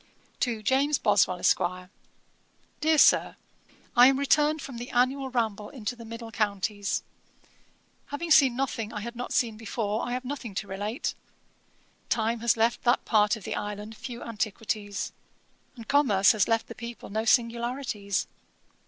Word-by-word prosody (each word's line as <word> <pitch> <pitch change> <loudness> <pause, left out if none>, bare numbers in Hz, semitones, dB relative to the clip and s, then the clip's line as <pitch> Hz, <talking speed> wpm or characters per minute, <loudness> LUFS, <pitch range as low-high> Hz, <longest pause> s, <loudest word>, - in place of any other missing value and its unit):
'To 230 -4 -1
JAMES 275 +4 +2
BOSWELL, 195 -3 +3
ESQ. 180 - +3 1.2
'DEAR 315 +1 +3
SIR, - - +5 0.6
'I 245 +1 +9
am 270 0 +3
returned 295 +2 +2
from 265 -4 -7
the 245 - -7
annual 265 +2 +1
ramble 220 -4 -2
into 245 -2 -5
the 235 -1 -11
middle 230 0 -8
counties. 205 -1 -1 1.0
Having 325 +3 -4
seen 270 -5 +6
nothing 240 -4 -2
I 210 - -5
had 235 +3 -6
not 245 +1 -5
seen 225 -3 +1
before, 220 -1 -2
I 245 - -3
have 255 +1 -3
nothing 250 -6 -6
to 200 - -3
relate. 205 +7 -3 1.0
Time 230 +1 0
has 235 0 +2
left 230 +1 +2
that 245 +1 +2
part 210 0 +3
of 220 - -11
the - - -4
island 210 +1 -5
few 240 +1 -7
antiquities; 210 -1 -3 0.6
and 230 -3 -11
commerce 235 -9 +4
has 215 -4 +2
left 225 -1 +1
the - - -9
people 235 -3 -9
no 220 +2 -1
singularities. 235 -3 0
230 Hz, 155 wpm, -27 LUFS, 210-255 Hz, 1.2 s, I